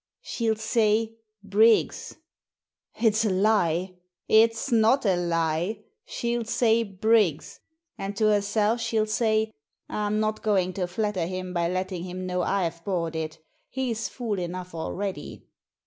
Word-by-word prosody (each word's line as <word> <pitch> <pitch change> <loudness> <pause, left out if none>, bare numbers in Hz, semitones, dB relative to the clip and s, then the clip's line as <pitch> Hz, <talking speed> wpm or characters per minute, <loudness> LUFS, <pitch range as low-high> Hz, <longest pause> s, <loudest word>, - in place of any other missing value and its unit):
"She'll 225 -2 -1
say 220 0 +1 0.3
'Briggs.'" 215 +3 +2 0.8
"Ifsalie!" 195 -5 +2 0.3
"It's 225 +3 +3
not 230 +3 +4
a 190 -3 +3
lie. 170 +4 -1 0.2
She'll 235 0 -2
say 230 0 +2
'Brii^s.' 205 -5 +1 0.4
And 195 +1 -4
to 215 - +2
herself 210 +2 +1
she'll 220 -2 +1
say, 220 0 +1 0.2
' - - -57
I'm 210 0 -1
not 215 0 -1
going 190 -4 +1
to 180 -1 -2
flatter 190 -2 -1
him 185 0 -5
by 170 -1 +1
letting 185 -1 -3
him 185 0 -6
know 180 0 -1
I've 170 -3 -1
bought 170 -4 -2
it 160 0 -4 0.3
He's 240 -4 -2
fool 225 -6 -3
enough 180 0 -5
already.'" 190 +4 -5
205 Hz, 130 wpm, -26 LUFS, 180-220 Hz, 0.8 s, not